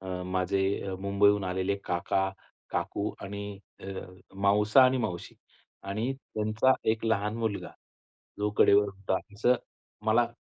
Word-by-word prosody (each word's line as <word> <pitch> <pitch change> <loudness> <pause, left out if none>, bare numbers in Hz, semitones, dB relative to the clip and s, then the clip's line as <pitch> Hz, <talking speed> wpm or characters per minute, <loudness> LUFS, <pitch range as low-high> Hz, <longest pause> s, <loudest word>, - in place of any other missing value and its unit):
अ, 95 -1 -4
माझे 95 +1 0
मुंबईहून 100 0 +3
आलेले 95 +1 0
काका, 95 +2 0 0.4
काकू 100 +4 -1
आणि 100 0 -6 0.2
अ, - - -11 0.5
मावसा 105 +5 +5
आणि 130 +1 +4
मावशी 105 -7 -4 0.5
आणि 110 +6 -1 0.2
त्यांचा 110 +4 +3 0.2
एक 110 0 -1
लहान 105 -1 +1
मुलगा, 110 -3 -2 0.7
जो 105 0 +1
कडेवर 100 +1 +6
होता 95 -1 -2 0.2
असं 120 +5 +3 0.5
मला 115 +2 +4
100 Hz, 120 wpm, -29 LUFS, 95-110 Hz, 0.7 s, कडेवर